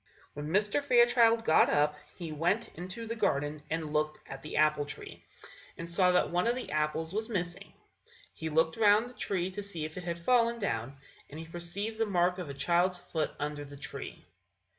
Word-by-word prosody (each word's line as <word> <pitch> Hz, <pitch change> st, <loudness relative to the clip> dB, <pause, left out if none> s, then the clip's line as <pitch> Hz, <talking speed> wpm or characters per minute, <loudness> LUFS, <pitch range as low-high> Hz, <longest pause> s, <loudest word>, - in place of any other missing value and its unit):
When 145 Hz, +1 st, -5 dB
Mr. 205 Hz, -, +1 dB
Fairchild 240 Hz, -3 st, +5 dB
got 160 Hz, -, +5 dB
up, 150 Hz, 0 st, +2 dB, 0.2 s
he 170 Hz, -3 st, -5 dB
went 175 Hz, +9 st, 0 dB
into 185 Hz, +7 st, -7 dB
the 230 Hz, +1 st, -4 dB
garden 145 Hz, -7 st, 0 dB
and 155 Hz, -1 st, -3 dB
looked 155 Hz, 0 st, 0 dB
at 135 Hz, -, -8 dB
the 150 Hz, -, -5 dB
apple 150 Hz, -1 st, +4 dB
tree, 145 Hz, -, -9 dB, 0.5 s
and 165 Hz, -, -6 dB
saw 180 Hz, +2 st, +4 dB
that 180 Hz, -, +2 dB
one 175 Hz, +4 st, +1 dB
of 240 Hz, -, +2 dB
the 255 Hz, -, -5 dB
apples 155 Hz, +2 st, -1 dB
was 220 Hz, +3 st, -2 dB
missing; 175 Hz, -5 st, -3 dB, 0.6 s
he 160 Hz, -, -4 dB
looked 160 Hz, +3 st, +2 dB
round 215 Hz, +2 st, +5 dB
the -, -, -14 dB
tree 190 Hz, -5 st, -2 dB
to 205 Hz, +2 st, -5 dB
see 175 Hz, -6 st, -5 dB
if 155 Hz, +2 st, -8 dB
it 180 Hz, -, -5 dB
had 170 Hz, 0 st, -3 dB
fallen 235 Hz, +5 st, +3 dB
down, 135 Hz, -, -2 dB, 0.3 s
and 150 Hz, -, -8 dB
he 165 Hz, -, -7 dB
perceived 175 Hz, +7 st, -4 dB
the 225 Hz, -, +2 dB
mark 180 Hz, -1 st, +2 dB
of 175 Hz, -5 st, -5 dB
a 140 Hz, -, -6 dB
child's 175 Hz, +6 st, +2 dB
foot 160 Hz, -2 st, -2 dB
under 145 Hz, 0 st, -3 dB
the 145 Hz, 0 st, -10 dB
tree. 140 Hz, -, -8 dB
175 Hz, 200 wpm, -31 LUFS, 155-210 Hz, 0.6 s, Fairchild